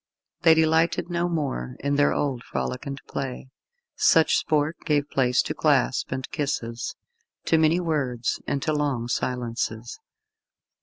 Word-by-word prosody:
They 160 -1 +6
delighted 160 +2 +2
no 175 0 0
more 135 - -2
in 140 +1 -1
their 145 0 +4
old 130 -4 -1
frolic 125 +2 -4
and 140 0 -5
play. 130 -1 -5 0.4
Such 160 -1 +4
sport 155 +1 0
gave 145 -2 +1
place 125 -2 +2
to - - -3
clasp - - +1
and 130 - -3
kisses, 125 -6 -3 0.5
to 160 - +3
many 160 +2 +3
words, 140 -8 -1
and 140 - -1
to 155 - 0
long 140 -6 -1
silences. 120 -2 -3
140 Hz, 140 wpm, -25 LUFS, 125-160 Hz, 0.5 s, They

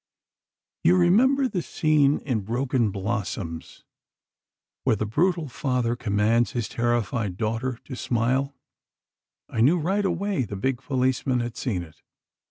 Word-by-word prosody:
"You 180 - +5
remember 255 +10 +4
the 185 -7 -2
scene 150 -3 +2
in 125 -6 -1
'Broken 120 +2 0
Blossoms,' 95 -5 -4 1.0
where - - +3
the 110 - -2
brutal 165 - +1
father 125 -2 -1
commands 115 +1 +1
his 120 -4 -2
terrified 120 -4 -1
daughter 115 +3 -2
to 130 - -7
smile. 130 +4 0 0.9
I 110 - -2
knew 150 +9 +5
right 190 +6 0
away 190 -3 0
the 100 - -6
big 130 +6 -1
policeman 130 -1 0
had 120 -1 -4
seen 100 -10 -2
it. 80 -2 -16
125 Hz, 130 wpm, -25 LUFS, 110-150 Hz, 1.0 s, You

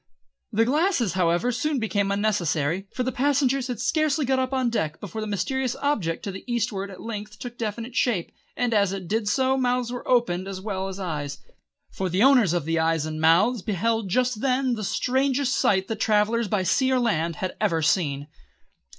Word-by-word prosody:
The 225 +2 +3
glasses, 280 - +1
however, 180 +6 +1
soon 285 +4 -1
became 205 -4 0
unnecessary, 190 -4 0
for 255 - -2
the 260 - -1
passengers 275 -1 +1
had 245 -4 -4
scarcely 310 -2 +1
got 260 0 +1
up 260 0 -1
on 260 -3 0
deck 155 -9 -2
before 205 +2 -6
the 215 - -3
mysterious 255 +6 -1
object 210 - -1
to 200 - -3
the 190 - -8
eastward 210 -4 -1
at 190 - -10
length 210 -1 -6
took 240 +3 -7
definite 230 +2 -5
shape, 215 -11 0 0.3
and 245 -1 0
as 200 -3 +2
it 190 -3 -6
did 215 +1 0
so 265 +1 +2
mouths 250 -1 0
were 245 - -6
opened 195 -7 +1
as 195 -1 -5
well 190 -1 -3
as 195 0 -6
eyes, 150 -6 -4 0.5
for 190 -1 -3
the 185 +5 +2
owners 255 - +5
of 175 -4 -1
the 165 0 0
eyes 160 -1 +1
and 155 0 -4
mouths 190 +9 +4
beheld 215 +2 -1
just 250 +1 +1
then 260 -1 +1
the 215 -2 -3
strangest 265 +4 +1
sight 190 -1 +2
that 220 -1 -4
travellers 220 +2 +2
by 195 -1 0
sea 260 - +2
or 260 - +3
land 170 -9 0
had 185 +3 -4
ever 165 -1 +1
seen. 145 -4 +1
215 Hz, 195 wpm, -25 LUFS, 185-250 Hz, 0.5 s, owners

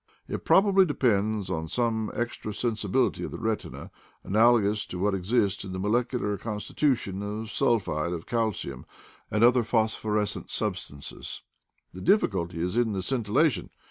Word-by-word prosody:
It - - -5
probably 195 -1 +5
de 145 -5 -3
pends 105 -4 +1
upon 80 -2 -2
some 110 0 0
extra 115 -3 -3
sensibility 110 +1 0
of - - -3
the - - -7
retina 110 -2 -4 0.3
analogous 110 -1 +3
to 90 - -6
what 100 +3 +1
exists 100 +1 +1
in 95 -2 -6
the 95 - -4
molecular 110 0 0
consti 105 -1 -5
tution 115 -10 0
of 105 +2 -5
sulphide 85 -10 +1
of 85 -2 -4
calcium 110 - -2 0.4
and 105 +2 +1
other 120 0 +6
phosphor 110 -2 0
escent 105 -1 -2
substances. 70 0 -5 0.5
The 90 - -8
difficulty 95 - +1
is 90 +3 -2
in 120 -3 +2
the 95 -2 -2
scintilla 130 - +2
tion. 90 -7 -6
110 Hz, 155 wpm, -27 LUFS, 95-120 Hz, 0.5 s, other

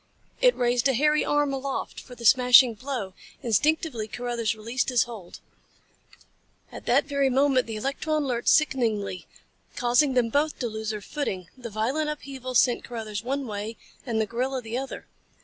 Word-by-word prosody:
It - - +5
raised 245 +1 +2
a 265 - +2
hairy 300 +4 +3
arm 290 -1 +1
aloft 270 0 -4
for 250 - -12
the 235 - -9
smashing 250 0 +7
blow. 240 -5 -5 0.3
Instinctively 245 - +1
Carruthers 235 -1 -2
released 230 +5 -2
his 245 -3 +3
hold. 220 -7 -10 1.3
At - - -10
that 275 +4 +3
very 280 -2 +1
moment 265 -1 +2
the 225 - -5
electron 285 +6 -1
lurched 240 -3 0
sickeningly, 220 - +1 0.5
causing 250 +3 +2
them 240 -2 +2
both 290 +5 0
to 245 - -2
lose 220 -1 -5
their 215 -2 -3
footing. 190 - -4
The 245 -2 -8
violent 255 +9 -1
upheaval 270 -4 -6
sent 245 0 +3
Carruthers 215 -3 -5
one 275 +3 -2
way 215 0 -5 0.3
and 230 -4 -2
the 220 - +2
gorilla 255 +4 -2
the 225 -1 -6
other. 265 +1 -5
245 Hz, 165 wpm, -26 LUFS, 225-275 Hz, 1.3 s, smashing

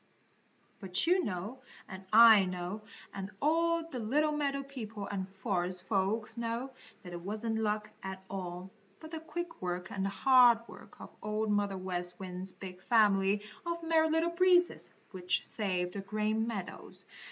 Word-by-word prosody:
But 185 -3 +1
you 360 +2 +3
know 210 - -4 0.3
and 190 -1 -9
I 220 -3 +8
know 180 +3 -4 0.3
and 195 0 -5
all 330 +2 +2
the 260 -7 -6
little 290 +8 +1
meadow 280 -2 -1
people 225 -7 -7
and 195 -1 -4
forest 180 -3 -1
folks 215 +3 0
know 235 +3 -3 0.3
that 180 -2 -9
it 175 - -6
wasn't 220 +4 -2
luck 215 0 -1
at 190 0 -6
all, 185 -1 -6 0.3
but 315 0 -11
the 325 - -4
quick 345 +2 -6
work 180 0 -3
and 195 0 -1
hard 245 +3 +6
work - - -14
of - - -10
Old 215 0 -1
Mother 205 -1 +1
West 180 -1 -4
Wind's 185 0 -6
big 185 -1 -10
family 205 -2 +3 0.2
of 340 -1 -3
Merry 320 -1 +3
Little 325 +2 +1
Breezes, 355 0 +3 0.2
which 185 -1 0
saved 180 -4 -1
the 200 - -4
Green 215 +2 -1
Meadows. 200 -6 -6
210 Hz, 155 wpm, -32 LUFS, 190-265 Hz, 0.3 s, I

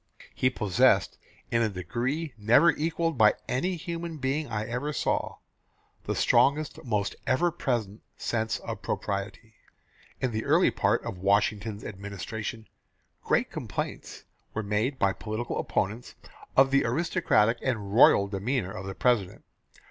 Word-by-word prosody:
He 130 - +2
possessed, 105 -7 +2 0.3
in 115 - +2
a 110 - +2
degree 125 - -3
never 115 +10 +5
equalled 165 -1 -1
by 105 -1 +6
any 180 +9 0
human 170 0 -5
being 140 +2 -1
I 110 -2 -3
ever 125 +6 -3
saw, - - -1 0.7
the - - -2
strongest, 145 +2 +2
most 105 -5 -1
ever 170 +7 +2
present 115 - -2 0.2
sense 110 -1 -1
of - - -6
propriety." 105 +3 -4 0.7
In 130 - -1
the 110 0 -2
early - - +4
part - - +1
of 90 - -6
Washington's 105 +2 +1
administration, 105 +3 -6 0.6
great - - +1
complaints - - -5 0.3
were 110 - -1
made 110 +7 -1
by 100 -4 +2
political 110 +4 -4
opponents 105 +5 -2 0.4
of 135 0 +6
the 140 0 +4
aristocratic 120 - +2
and 105 -7 -2
royal 100 -3 +6
demeanour 100 +1 -2
of 95 0 -7
the 95 - -5
President. 115 -7 +1
115 Hz, 135 wpm, -27 LUFS, 105-135 Hz, 0.7 s, by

